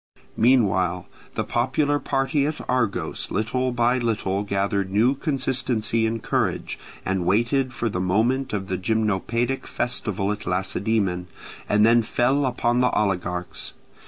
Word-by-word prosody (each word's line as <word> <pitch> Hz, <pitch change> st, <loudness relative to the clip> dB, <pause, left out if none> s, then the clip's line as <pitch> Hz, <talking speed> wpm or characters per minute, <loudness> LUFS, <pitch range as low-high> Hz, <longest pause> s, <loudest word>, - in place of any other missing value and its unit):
Meanwhile 95 Hz, -8 st, +2 dB, 0.3 s
the -, -, 0 dB
popular 140 Hz, +4 st, +1 dB
party 140 Hz, +1 st, 0 dB
at 155 Hz, -, -3 dB
Argos 125 Hz, -5 st, -1 dB
little 125 Hz, +5 st, -1 dB
by 120 Hz, +1 st, +2 dB
little 100 Hz, -5 st, -1 dB
gathered 100 Hz, -1 st, -1 dB
new 110 Hz, +7 st, +3 dB
consistency 130 Hz, -5 st, 0 dB
and 115 Hz, 0 st, -3 dB
courage, -, -, -1 dB, 0.3 s
and 95 Hz, -1 st, 0 dB
waited 120 Hz, +8 st, +1 dB
for 120 Hz, -, -2 dB
the 90 Hz, -4 st, -2 dB
moment 115 Hz, +8 st, +1 dB
of 100 Hz, -2 st, -2 dB
the 95 Hz, -1 st, -3 dB
Gymnopaedic 110 Hz, +5 st, 0 dB
festival 105 Hz, -5 st, -1 dB
at 105 Hz, -, -5 dB
Lacedaemon, 95 Hz, 0 st, 0 dB, 0.4 s
and 105 Hz, +1 st, +4 dB
then 115 Hz, +1 st, +5 dB
fell 130 Hz, +5 st, +1 dB
upon 120 Hz, -1 st, +1 dB
the 125 Hz, 0 st, +4 dB
oligarchs. 90 Hz, -4 st, -2 dB
115 Hz, 130 wpm, -24 LUFS, 95-125 Hz, 0.4 s, then